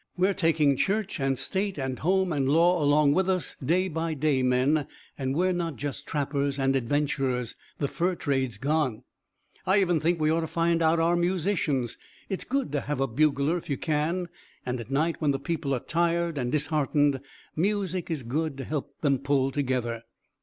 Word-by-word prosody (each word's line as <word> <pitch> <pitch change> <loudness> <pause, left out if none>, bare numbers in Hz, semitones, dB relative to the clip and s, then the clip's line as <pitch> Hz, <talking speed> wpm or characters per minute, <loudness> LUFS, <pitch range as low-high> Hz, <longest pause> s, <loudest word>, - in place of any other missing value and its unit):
We're 190 +2 +3
taking 155 -6 +2
church 200 0 0
and 135 -1 0
state 195 +4 -1
and 130 -2 -3
home 185 +1 +1
and 135 -2 0
law 170 +2 +4
along 145 0 +4
with 190 +3 +1
us, 185 -2 -1
day 180 +7 +2
by 165 -1 -2
day, 145 -2 +1
men, 130 +4 +2 0.3
and 135 -1 -2
we're 185 +3 +2
not 170 -4 -2
just 145 0 -5
trappers 140 -1 -1
and 135 0 +1
adventurers. 135 -2 0 0.2
The 140 - 0
fur 175 +5 -1
trade's 130 -8 -1
gone. 140 -2 0 0.6
"I 190 +2 +4
even 175 -4 +2
think 165 +2 +1
we 155 0 +2
ought 165 - +2
to 160 - -3
find 170 +1 +1
out 165 +1 +3
our 165 +1 +3
musicians 175 - 0 0.3
it's 190 - -2
good 275 - -1
to 145 -1 0
have 145 -2 -3
a 135 - +2
bugler, 145 +5 +1
if - - -15
you 140 - 0
can. 165 +3 -1 0.4
And 125 0 -2
at 115 - -8
night, 155 +5 +1
when 150 - +1
the 135 -1 +1
people 145 -1 -3
are - - -2
tired 170 +2 0
and 125 -3 -2
disheartened, 145 -2 +1 0.3
music 185 0 -1
is 155 -6 -2
good 145 +4 -2
to 135 - -5
help 140 -1 -5
them 140 -4 +2
pull 140 -1 +1
together." 125 -4 -1
150 Hz, 190 wpm, -27 LUFS, 135-170 Hz, 0.6 s, law